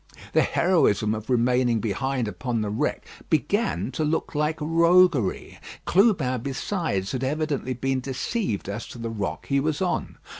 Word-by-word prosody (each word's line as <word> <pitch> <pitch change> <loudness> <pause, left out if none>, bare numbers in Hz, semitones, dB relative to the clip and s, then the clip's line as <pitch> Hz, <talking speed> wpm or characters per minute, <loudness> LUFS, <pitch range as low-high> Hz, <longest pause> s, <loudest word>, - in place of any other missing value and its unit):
The - - +5
heroism 110 - +2
of 110 +2 -6
remaining 125 -1 +2
behind 120 +4 -1
upon 105 +4 -2
the 105 -1 -2
wreck 105 - -1 0.2
began 85 - 0
to 155 - -2
look 155 +2 -1
like 150 +1 0
roguery. 165 - +3 0.3
Clubin 170 - +3
besides 135 - -2
had 130 -1 -3
evidently 140 -2 -1
been 135 +2 -1
deceived 130 - -3
as 100 +3 -5
to - - -10
the 115 -1 -4
rock 105 -3 -4
he 140 0 +1
was 150 +1 -1
on. 185 -2 -2
130 Hz, 150 wpm, -25 LUFS, 115-155 Hz, 0.3 s, The